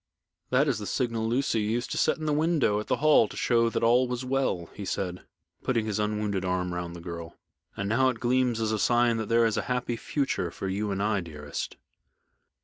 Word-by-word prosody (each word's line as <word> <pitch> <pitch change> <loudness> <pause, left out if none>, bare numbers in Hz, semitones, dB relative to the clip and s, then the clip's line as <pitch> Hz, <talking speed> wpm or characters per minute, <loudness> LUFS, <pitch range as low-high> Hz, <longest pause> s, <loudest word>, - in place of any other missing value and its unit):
"That 135 +4 +3
is 130 -6 0
the 105 - -5
signal 115 -3 -1
Lucy 120 -1 +1
used 115 +4 -1
to - - -2
set - - +2
in 155 - -5
the 150 - +1
window 150 -9 +2
at 105 - -6
the - - +2
Hall 150 -7 +5
to - - -10
show 115 -1 +3
that - - -2
all 120 +2 +4
was 125 +1 -3
well," 130 -10 0
he 105 - -7
said, 90 -1 -4 0.3
putting 115 -4 0
his 105 -1 -2
unwounded 105 -2 -1
arm 90 -1 -1
round 85 -1 -4
the 85 - -9
girl, 85 -1 -7 0.4
"and 100 - -2
now 130 +5 +3
it 120 -3 -4
gleams 125 -1 +1
as 110 -1 0
a 110 - 0
sign 120 0 +3
that 110 -2 -3
there 115 0 +4
is 110 - +1
a - - +1
happy 125 -1 -1
future 135 - -1
for 95 - -5
you 100 +2 -1
and 100 0 -1
I, 105 -1 +1
dearest." 75 -4 -6
110 Hz, 225 wpm, -27 LUFS, 100-125 Hz, 0.4 s, Hall